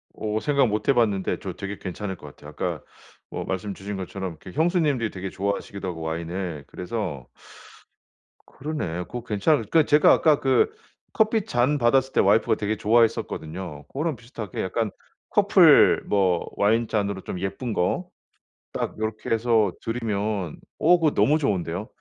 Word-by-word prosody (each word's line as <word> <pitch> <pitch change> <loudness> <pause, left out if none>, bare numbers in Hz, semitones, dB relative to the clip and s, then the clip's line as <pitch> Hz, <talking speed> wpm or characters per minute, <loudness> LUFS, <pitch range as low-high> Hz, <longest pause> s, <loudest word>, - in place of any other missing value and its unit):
어 110 0 -2
생각 140 -4 +3
못해봤는데 105 -3 +1
저 - - -6
되게 100 0 -6
괜찮을 95 +1 -5
것 - - -12
같아요. - - -12
그러니까 - - -3 0.5
뭐 - - -5
말씀 95 +1 -3
주신 100 +2 -6
것처럼 95 0 -5
이렇게 95 - -10
형수님들이 155 - +1
되게 95 -1 -6
좋아하시기도 100 0 -3
하고, 85 -2 -5
와인을. 85 -1 -4
그래서 90 - -5 1.2
그러네. 130 - -4
그거 120 +3 -7
괜찮을 115 +4 +1
그 160 -2 +5
제가 150 +1 +5
아까 155 -3 +4
그 135 - +2 0.4
커피 220 -1 +2
잔 125 +5 +1
받았을 130 +1 +2
때 - - +2
와이프가 105 +3 +3
되게 105 +1 -2
좋아했었거든요. 95 -8 0
그거랑 150 - -2
비슷하게 115 -5 -7
약간 110 +3 -1 0.4
커플 - - +6
뭐 95 -4 +1
와인 110 +3 +2
잔으로 100 -3 -1
좀 90 - -6
예쁜 100 +6 -3
거 170 - -1 0.7
딱 - - -4
요렇게 110 0 -4
해서 115 -3 +2
드리면 105 -6 -2 0.2
어 180 0 +5
그거 155 -3 +2
너무 125 +10 +3
좋은데요. 95 - -2
105 Hz, 345 characters per minute, -24 LUFS, 95-125 Hz, 1.2 s, 커플